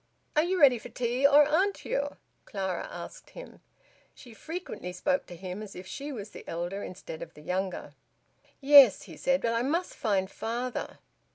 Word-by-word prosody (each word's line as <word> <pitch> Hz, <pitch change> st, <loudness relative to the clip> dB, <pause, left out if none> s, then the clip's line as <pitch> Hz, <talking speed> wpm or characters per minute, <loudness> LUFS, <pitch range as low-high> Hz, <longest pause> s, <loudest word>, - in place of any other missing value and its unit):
"Are 305 Hz, -, +5 dB
you 360 Hz, +3 st, 0 dB
ready 260 Hz, -6 st, +6 dB
for -, -, -10 dB
tea, 250 Hz, +3 st, +2 dB
or 290 Hz, +1 st, +6 dB
aren't 375 Hz, +7 st, +1 dB
you?" 285 Hz, +1 st, -2 dB, 0.3 s
Clara 190 Hz, -4 st, -3 dB
asked -, -, -9 dB
him. -, -, -12 dB, 0.5 s
She 245 Hz, -4 st, -13 dB
frequently 310 Hz, -, -6 dB
spoke 275 Hz, +10 st, 0 dB
to 175 Hz, -, -9 dB
him 185 Hz, +3 st, -6 dB
as 210 Hz, -2 st, -9 dB
if 180 Hz, -, -8 dB
she 285 Hz, +9 st, -6 dB
was 215 Hz, -5 st, -7 dB
the -, -, -10 dB
elder 175 Hz, +4 st, -4 dB
instead 170 Hz, -4 st, -8 dB
of -, -, -9 dB
the 150 Hz, -, -13 dB
younger. 185 Hz, +2 st, -3 dB, 0.7 s
"Yes," 275 Hz, -6 st, +8 dB
he 165 Hz, -, -11 dB
said. 270 Hz, -, +1 dB
"But 230 Hz, -, +1 dB
I 230 Hz, -, +1 dB
must 325 Hz, +8 st, -1 dB
find 195 Hz, -4 st, 0 dB
father." 240 Hz, +2 st, -4 dB
235 Hz, 180 wpm, -29 LUFS, 190-285 Hz, 0.7 s, Yes